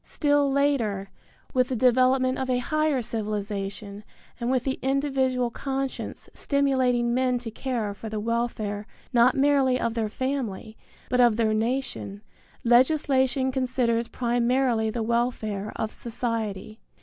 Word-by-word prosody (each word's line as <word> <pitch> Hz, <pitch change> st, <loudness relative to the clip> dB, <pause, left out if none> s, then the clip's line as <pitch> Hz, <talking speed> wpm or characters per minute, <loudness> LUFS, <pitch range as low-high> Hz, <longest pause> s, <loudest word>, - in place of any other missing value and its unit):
Still 290 Hz, -2 st, +1 dB
later, 235 Hz, -9 st, 0 dB, 0.4 s
with 255 Hz, -1 st, +3 dB
the 260 Hz, -, -2 dB
development 255 Hz, +2 st, +3 dB
of 260 Hz, -1 st, -2 dB
a 250 Hz, -, +2 dB
higher 305 Hz, 0 st, 0 dB
civilization 205 Hz, -2 st, -4 dB, 0.4 s
and 240 Hz, 0 st, -2 dB
with 255 Hz, -2 st, +1 dB
the 265 Hz, 0 st, -2 dB
individual 265 Hz, -2 st, 0 dB
conscience 270 Hz, +1 st, -4 dB
stimulating 255 Hz, -4 st, +1 dB
men 255 Hz, 0 st, +2 dB
to 235 Hz, -2 st, -6 dB
care 225 Hz, -3 st, -3 dB
for 220 Hz, +2 st, -8 dB
the 215 Hz, 0 st, -3 dB
welfare 215 Hz, -2 st, -2 dB, 0.3 s
not 240 Hz, +1 st, +5 dB
merely 270 Hz, -2 st, +3 dB
of 230 Hz, -, -1 dB
their 225 Hz, -2 st, -1 dB
family, 235 Hz, -4 st, -3 dB, 0.3 s
but 250 Hz, 0 st, +2 dB
of 240 Hz, -3 st, +5 dB
their 220 Hz, -2 st, +2 dB
nation, 220 Hz, -3 st, -2 dB, 0.4 s
legislation 260 Hz, +1 st, +3 dB
considers 250 Hz, -3 st, 0 dB
primarily 240 Hz, -1 st, +1 dB
the 225 Hz, +1 st, -2 dB
welfare 220 Hz, -3 st, -1 dB
of 220 Hz, -, -3 dB
society. 225 Hz, -3 st, -4 dB
245 Hz, 130 wpm, -26 LUFS, 220-265 Hz, 0.4 s, not